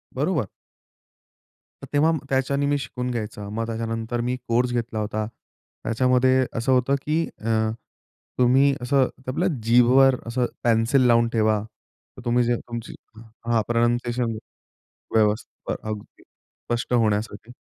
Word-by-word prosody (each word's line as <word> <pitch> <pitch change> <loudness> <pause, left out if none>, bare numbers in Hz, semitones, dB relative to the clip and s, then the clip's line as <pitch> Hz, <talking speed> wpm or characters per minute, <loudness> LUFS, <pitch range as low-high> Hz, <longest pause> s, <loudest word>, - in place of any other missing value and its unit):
बरोबर. - - 0 1.4
तर - - -7
तेव्हा 150 +3 +4 0.2
त्याच्यानी 135 +1 +1
मी 145 0 +2
शिकून 125 -2 -4
घ्यायचं 105 -3 -5
मग 115 +1 -2
त्याच्यानंतर 115 +1 -3
मी 125 +1 -1
कोर्स 120 +1 +1
घेतला 115 -2 -2
होता. 105 0 -2 0.6
त्याच्यामध्ये 130 +2 +3
असं 120 +3 0
होतं, 130 +2 +3
की 155 +3 0 0.2
अ, 110 0 +1 0.7
तुम्ही 135 +3 +5
असं 130 +1 +2 0.2
आपल्या 150 +8 0 0.2
जीभवर 125 +3 +5
असं 125 +1 0 0.2
पेन्सिल 115 +3 +3
लावून 115 -1 +4
ठेवा. 110 -2 +2 0.6
तर - - -9
तुम्ही 120 +1 +3
जे 120 0 +1
तुमची 120 -1 -7 0.2
हां, 115 +1 -2
प्रोनन्सिएशन 120 0 0 0.8
व्यवस्थित 110 0 0
अ, - - -1
अगदी 105 -1 -8
स्पष्ट 120 +1 -6
होण्यासाठी. 110 -1 0
120 Hz, 125 wpm, -24 LUFS, 115-130 Hz, 1.4 s, तुम्ही